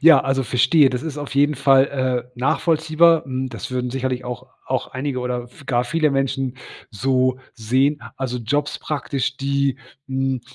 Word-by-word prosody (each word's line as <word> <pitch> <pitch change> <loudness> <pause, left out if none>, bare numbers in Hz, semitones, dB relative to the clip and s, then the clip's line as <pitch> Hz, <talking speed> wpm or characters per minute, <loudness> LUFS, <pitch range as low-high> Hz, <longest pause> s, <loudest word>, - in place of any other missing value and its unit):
Ja, 160 -2 +8
also 135 0 0
verstehe, 130 +4 +4
das 125 0 -3
ist 155 -2 -5
auf 145 -1 -6
jeden 145 +2 +3
Fall, 135 0 +5 0.5
äh, - - -17
nachvollziehbar. 160 +3 +3
Hm, 130 -1 -3
das - - -7
würden 125 -1 -2
sicherlich 130 -1 -2
auch 125 -1 -6 0.2
auch - - -1
einige 130 0 -3
oder 125 -1 -3
v 145 - -17
gar 125 -2 +1
viele 155 +3 +1
Menschen 135 -1 -1 0.3
so 130 +3 +1 0.2
sehen. 130 +5 +1 0.2
Also 125 -2 -3
Jobs 145 +6 -1
praktisch, 135 -3 -2
die, 140 -1 0 0.3
hm, 135 -1 -1
135 Hz, 165 wpm, -21 LUFS, 125-145 Hz, 0.5 s, Ja